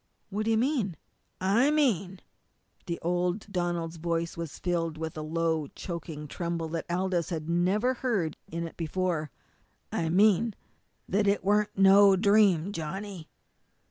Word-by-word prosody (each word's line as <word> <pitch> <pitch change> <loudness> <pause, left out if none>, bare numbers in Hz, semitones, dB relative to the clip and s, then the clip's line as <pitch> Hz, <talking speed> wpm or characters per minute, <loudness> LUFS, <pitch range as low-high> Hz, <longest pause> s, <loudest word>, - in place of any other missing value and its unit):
"What 210 +2 -2
do - - 0
you 225 - +3
mean?" 235 - 0 0.4
"I 205 +9 +3
mean" 200 - +1 0.7
and 170 -1 -3
old 180 +3 0
Donald's 175 -2 -2
voice 165 0 -2
was 165 -3 -6
filled 165 -3 -1
with 160 +1 -5
a 155 - -4
low, 160 -1 -1
choking 160 -4 -6
tremble 170 +1 -3
that 165 0 -4
Aldous 180 -1 0
had 160 -3 -4
never 190 +9 +2
heard 220 - -1 0.2
in 170 +1 -3
it - - -13
before 165 -2 -1 0.6
"I 165 -1 -1
mean 205 +4 +3 0.5
that 200 +2 +1
it 200 -1 +2
weren't 210 +1 +2
no 195 0 +7
dream, 200 -3 +4
Johnny! 185 +1 -6
175 Hz, 140 wpm, -28 LUFS, 165-200 Hz, 0.7 s, no